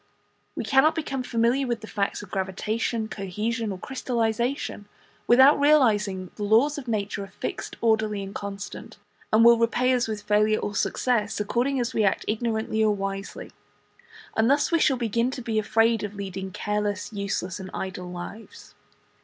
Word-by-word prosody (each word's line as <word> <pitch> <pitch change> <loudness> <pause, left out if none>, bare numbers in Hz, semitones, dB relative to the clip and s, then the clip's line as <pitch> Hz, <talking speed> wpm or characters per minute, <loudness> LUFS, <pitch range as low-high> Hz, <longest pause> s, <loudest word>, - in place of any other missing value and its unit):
We - - -3
cannot 285 +4 +4
become 285 -5 -3
familiar 245 +2 +1
with 235 -2 -2
the - - -7
facts 205 -1 -2
of 200 - -13
gravitation, 215 +4 -2
cohesion, 215 +3 -3
or 190 - -5
crystallization, 235 -1 -2 0.4
without 265 +4 +7
realizing 215 -10 +3
that 180 - -18
the 210 - -4
laws 245 +9 +3
of 260 - -11
nature 205 -2 -2
are - - -13
fixed, 195 - -6
orderly, 220 -3 +1
and 195 0 -8
constant, 200 0 -7 0.3
and 225 +2 +5
will 235 0 +7
repay 245 +2 +2
us 245 -2 +1
with 215 -1 -4
failure 215 +1 +3
or 205 - -3
success 215 -1 0
according 245 +6 0
as 245 +1 -2
we 220 - +2
act 195 - +1
ignorantly 220 0 0
or 210 -1 +3
wisely; 195 0 -5 0.8
and 220 +2 +3
thus 285 +4 +2
we 335 - +3
shall 270 -4 +3
begin 235 +1 0
to 260 -1 -6
be 225 -2 0
afraid 225 +1 +2
of 205 0 -5
leading 190 -1 -5
careless, 210 +2 -2
useless, 200 -2 -3
and 190 0 -7
idle 185 -1 -5
lives. 180 +5 -9
220 Hz, 170 wpm, -25 LUFS, 200-240 Hz, 0.8 s, without